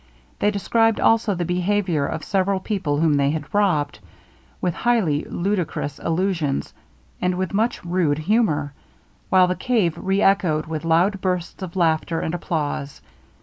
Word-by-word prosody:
They 205 - +3
described 225 +2 +1
also 225 -3 +3
the 175 0 -2
behaviour 180 -4 0
of 160 - -4
several 195 0 0
people 185 -8 -2
whom 155 -2 +3
they 140 0 +2
had 150 -1 -4
robbed, 180 - +1 0.6
with 180 - -1
highly 195 -12 +1
ludicrous 175 -6 -2
allusions, 165 -4 -1 0.5
and 180 0 +1
with 185 0 -3
much 220 -1 0
rude 170 -4 +1
humour, 155 -5 +1 0.6
while 185 -1 +6
the 180 0 -1
cave 185 -4 +1
re 195 +1 0
echoed 175 -6 +2
with 160 0 -5
loud 180 +4 +2
bursts 180 0 -2
of 185 -1 -6
laughter 165 -1 +1
and 160 - -3
applause. 150 -4 -3
180 Hz, 145 wpm, -22 LUFS, 155-195 Hz, 0.6 s, while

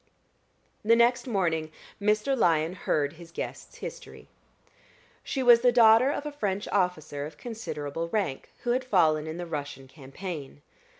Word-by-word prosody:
The 230 +2 +5
next 240 +2 +3
morning 165 -8 0 0.3
Mr. 210 +6 +2
Lyon 165 -7 +2
heard 150 -5 -1
his 170 0 -13
guest's - - -7
history. - - -9 0.9
She 265 - -2
was 240 -1 +7
the 245 0 +5
daughter 230 +1 +6
of 290 0 -3
a 295 - -3
French 205 -8 -2
officer 160 -7 -1
of 150 - -14
considerable 165 - -5
rank, 190 -9 -2
who 240 - 0
had 255 +2 +1
fallen 160 -10 +2
in 160 +1 -5
the 175 - -4
Russian 145 -4 -6
campaign. 145 +1 -8
180 Hz, 145 wpm, -27 LUFS, 155-235 Hz, 0.9 s, was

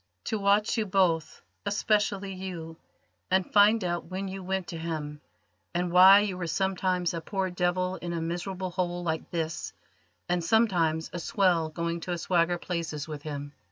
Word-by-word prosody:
"To 220 - -2
watch 205 +3 +2
you 215 - -1
both, 180 -5 +1 0.2
especially 205 -1 0
you, 175 -4 -6 0.5
and 190 0 +1
find 210 +1 +6
out 175 -1 -2
when 185 +3 -4
you 190 0 -6
went 190 0 -2
to 165 - -5
him, 150 -3 -4 0.5
and 175 0 0
why 190 +3 +9
you 195 -3 -2
were 175 - -3
sometimes 185 0 0
a 165 - -3
poor 190 +1 -2
devil 180 +1 0
in 175 - -5
a 170 - -2
miserable 180 +3 -3
hole 175 -1 -2
like 160 -2 -2
this, 165 -2 -3 0.5
and 175 -1 0
sometimes 170 -7 +2
a 175 - -3
swell 175 -3 +2
going 170 +1 -3
to 175 +1 -3
swagger 175 0 +1
places 165 -4 -4
with 150 -2 -6
him." 145 -1 -6
180 Hz, 165 wpm, -28 LUFS, 165-190 Hz, 0.5 s, why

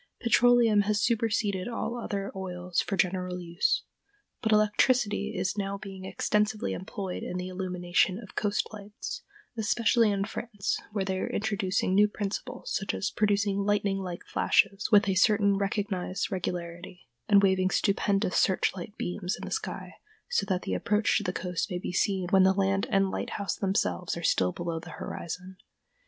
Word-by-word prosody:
Petroleum 235 -2 +5
has 205 0 +1
superseded 210 -4 +1
all 235 0 -3
other 200 -4 -3
oils 180 -2 -2
for 195 - -3
general 180 -2 0
use, 175 +1 0 0.6
but 220 - 0
electricity 210 0 +2
is 185 +3 -1
now 200 0 -2
being 195 -2 -9
extensively 210 +3 0
employed 190 0 -5
in 180 - -4
the 180 0 -4
illumination 180 0 0
of 210 -3 -11
coast 205 -1 0
lights, 205 0 -7 0.4
especially 230 +1 +3
in 200 -1 0
France, 210 -2 -3
where 200 -2 -1
they 190 -1 -1
are - - -2
introducing 200 -3 0
new 205 +2 +6
principles, 205 -1 -4
such 195 - -1
as 205 - -2
producing 205 -1 +1
lightning 200 -1 +1
like 180 -2 -6
flashes 200 +2 +2
with 205 -1 +6
a 195 - +2
certain 200 +1 +4
recognized 195 -2 -2
regularity, 175 -1 -5 0.2
and 200 -1 +6
waving 190 -1 +3
stupendous 195 -1 +1
search 190 0 +2
light 195 +3 -8
beams 180 +1 -3
in - - -6
the - - -7
sky, - - -4 0.3
so 485 - 0
that 185 -2 0
the 95 - -2
approach 210 - +1
to - - +2
the 180 - -1
coast 180 0 -3
may 180 - -2
be 180 - -4
seen 190 0 +1
when 190 -2 +6
the 190 0 +5
land 195 0 +1
and 195 -1 +2
lighthouse 200 -2 -3
themselves 190 -3 -1
are 170 - -6
still 90 - +2
below 170 - -4
the 165 +1 -11
horizon. 180 +3 -6
195 Hz, 165 wpm, -28 LUFS, 185-210 Hz, 0.6 s, new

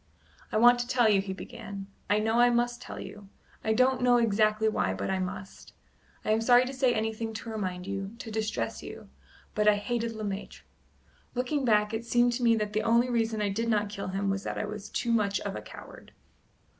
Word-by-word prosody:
"I 215 - +1
want 240 +2 +6
to 240 - -2
tell 245 -2 +3
you," 200 -2 +4
he 195 0 -5
began 200 -1 -7 0.2
"I 205 - +4
know 220 +2 +1
I 245 0 +6
must 240 0 0
tell - - -8
you 205 -2 -10 0.3
I 220 - +1
don't 255 +2 +3
know 245 -1 +5
exactly 215 -1 +2
why, 95 - 0
but 95 - -3
I 190 - 0
must 185 +1 -6 0.5
I - - +1
am 220 +1 +2
sorry 245 +2 +5
to 260 - -5
say 255 -1 +2
anything 220 0 -2
to 225 +1 -6
remind 185 -4 -4
you 195 +2 -5
to 225 - -8
distress 220 0 -2
you - - -10 0.4
but 210 0 +1
I 210 - +7
hated 230 +2 -2
Le 215 -1 -6
Maître! 200 -1 -5 0.7
Looking 255 +3 -1
back, 210 -2 +3
it 220 +1 -2
seems 240 0 +2
to 250 - -5
me 230 -1 +5
that 210 -1 -2
the 215 - +1
only 235 +2 +3
reason 225 -2 0
I 205 - +1
did 230 +4 -1
not 210 -2 +1
kill 200 -2 -5
him 195 +1 -1
was 195 0 -2
that - - -4
I - - -1
was 210 0 -7
too 235 - -1
much 205 -3 +2
of - - -4
a - - -5
coward." - - -12
220 Hz, 220 wpm, -29 LUFS, 205-240 Hz, 0.7 s, I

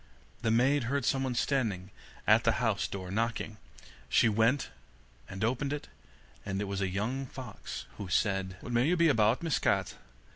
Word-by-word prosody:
The 115 - +1
maid 125 +4 +3
heard 140 +1 0
someone 135 -2 +1
standing 110 -9 0 0.3
at 110 +1 +5
the 115 -2 +3
house 115 -4 0
door, 95 -2 -6
knocking. 110 0 -1 0.5
She - - +5
went 115 +5 +2 0.6
and 95 +3 -5
opened 130 +5 0
it, 145 - -6 0.5
and 95 -1 -3
it - - 0
was 100 0 -3
a 95 - 0
young 120 +8 -2
fox, 125 -5 -7
who 100 - -5
said: 95 0 0
'What 125 - -6
may 120 +3 +3
you 180 +2 +3
be 170 -1 +5
about, 115 +1 +3
Miss 165 -3 +1
Cat? - - +1
115 Hz, 175 wpm, -31 LUFS, 100-135 Hz, 0.6 s, at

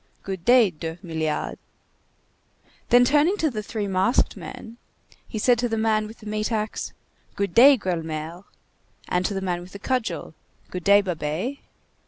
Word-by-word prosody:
good 190 -3 -5
day, 240 -2 +5
Deuxmilliards!" 160 -1 -4 1.3
Then 245 0 +6
turning 300 +9 +3
to 315 -6 +1
the 215 -3 -3
three 210 -1 -4
masked 190 +5 +2
men, 250 -3 -9 0.5
he 220 - -6
said 240 +2 +3
to 245 0 0
the 225 - -1
man 215 -1 +1
with 220 +2 -13
the - - -12
meat 215 +1 -2
axe:— 215 -1 -2 0.4
"Good 200 -3 -2
day, 270 +3 +8
Gueulemer!" 165 -2 -4 0.6
And 180 0 +1
to 205 - -4
the 195 - -2
man 180 -2 -2
with 180 +1 -12
the - - -6
cudgel:— 200 - -2 0.4
"Good 180 -1 -5
day, 200 +1 +7
Babet!" 180 - -3
205 Hz, 160 wpm, -24 LUFS, 175-235 Hz, 1.3 s, day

